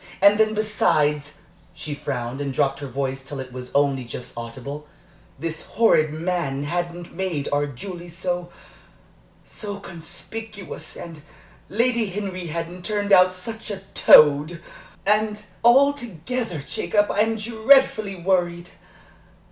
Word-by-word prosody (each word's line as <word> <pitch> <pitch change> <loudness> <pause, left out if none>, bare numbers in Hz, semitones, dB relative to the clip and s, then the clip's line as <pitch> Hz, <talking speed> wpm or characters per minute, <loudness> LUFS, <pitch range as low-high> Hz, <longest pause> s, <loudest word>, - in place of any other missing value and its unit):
And 200 +2 +6
then, 215 0 +3
besides" 150 -9 +1 0.4
she 150 - -5
frowned 125 -1 -4
and 140 -1 -2
dropped 135 +1 +1
her 140 - -5
voice 135 +1 -3
till 135 +1 -7
it 130 -1 -7
was 125 0 -7
only 140 -2 +2
just 120 +1 -7
audible 130 +6 -7 0.5
"this 160 +2 -4
horrid 155 -9 +3
man 155 -4 -2
hadn't 175 +2 -4
made 170 -5 -2
our 145 0 +1
Julie 175 +6 -8
so 175 +1 -3 1.0
so 205 -2 -7
conspicuous, 200 +4 -8
and 165 -3 -9 0.5
Lady 235 +1 +1
Henry 190 -2 -4
hadn't 170 +2 -5
turned 205 -1 0
out 185 -1 +6
such 220 +5 -5
a 200 -2 -5
toad 150 +3 +6 0.5
and, 210 +1 +1 0.2
altogether, 240 - +2
Jacob, 205 -1 +1
I'm 220 +2 +2
dreadfully 220 -1 +3
worried." 175 -1 0
175 Hz, 125 wpm, -23 LUFS, 145-210 Hz, 1.0 s, And